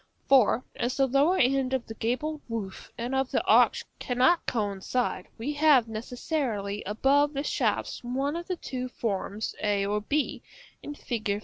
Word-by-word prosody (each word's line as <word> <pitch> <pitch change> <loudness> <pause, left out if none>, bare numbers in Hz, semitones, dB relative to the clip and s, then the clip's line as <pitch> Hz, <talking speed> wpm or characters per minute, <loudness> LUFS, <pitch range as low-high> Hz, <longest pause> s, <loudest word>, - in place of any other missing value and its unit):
For, 255 -2 +4
as 245 +2 -2
the 270 - +4
lower 280 +8 +3
end 265 0 +2
of 255 - -3
the 225 - -7
gabled 270 +8 -2
roof 210 -4 -5
and 240 +3 -3
of 265 -1 +1
the - - 0
arch - - +4
cannot 260 +7 +2
coincide, 205 -1 -1
we 265 +7 -3
have 290 -5 +5
necessarily 225 -2 -3
above 280 +7 +2
the 280 0 -2
shafts - - -1
one 270 +5 -1
of 345 0 -5
the 365 - -1
two 255 -5 -4
forms 210 -2 -3
a 205 -1 +1
or 210 +1 0
b, 290 +7 -1 0.4
in 290 - -7
Fig. 215 -7 -2
250 Hz, 165 wpm, -28 LUFS, 215-280 Hz, 0.4 s, have